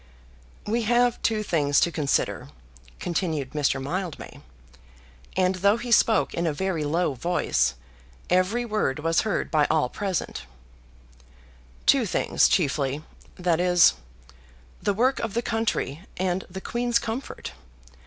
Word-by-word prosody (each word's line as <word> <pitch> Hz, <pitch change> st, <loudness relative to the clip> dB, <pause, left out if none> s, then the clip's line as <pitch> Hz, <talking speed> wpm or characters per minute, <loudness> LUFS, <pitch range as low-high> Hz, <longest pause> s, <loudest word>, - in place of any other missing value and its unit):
"We 230 Hz, +3 st, 0 dB
have 240 Hz, +2 st, +2 dB
two 215 Hz, -1 st, 0 dB
things 145 Hz, -7 st, +2 dB
to 170 Hz, -, +2 dB
consider," 145 Hz, -3 st, -1 dB, 0.5 s
continued 160 Hz, -6 st, -2 dB
Mr. 145 Hz, -3 st, 0 dB
Mildmay, 170 Hz, +4 st, -5 dB, 1.0 s
and 185 Hz, 0 st, +3 dB
though 200 Hz, +4 st, +3 dB
he 240 Hz, +1 st, -6 dB
spoke 225 Hz, -1 st, +4 dB
in 170 Hz, 0 st, -1 dB
a 155 Hz, -, 0 dB
very 180 Hz, -1 st, -2 dB
low 160 Hz, +1 st, 0 dB
voice, 170 Hz, -, 0 dB, 0.5 s
every 185 Hz, +7 st, +1 dB
word 215 Hz, -, -1 dB
was 165 Hz, +2 st, +1 dB
heard 215 Hz, -4 st, -2 dB
by 150 Hz, -2 st, +3 dB
all 155 Hz, -6 st, +2 dB
present, 190 Hz, -, -3 dB, 1.4 s
"two -, -, +4 dB
things -, -, +2 dB
chiefly, 140 Hz, +1 st, 0 dB, 0.3 s
that 175 Hz, -2 st, 0 dB
is; 175 Hz, -, +5 dB, 0.9 s
the 205 Hz, -1 st, 0 dB
work 255 Hz, +5 st, +2 dB
of 225 Hz, -2 st, -4 dB
the 235 Hz, -, 0 dB
country 225 Hz, -, -1 dB, 0.2 s
and 185 Hz, 0 st, -1 dB
the 190 Hz, +1 st, -7 dB
Queen's 240 Hz, +2 st, 0 dB
comfort. 235 Hz, +4 st, -5 dB
180 Hz, 130 wpm, -25 LUFS, 155-215 Hz, 1.4 s, is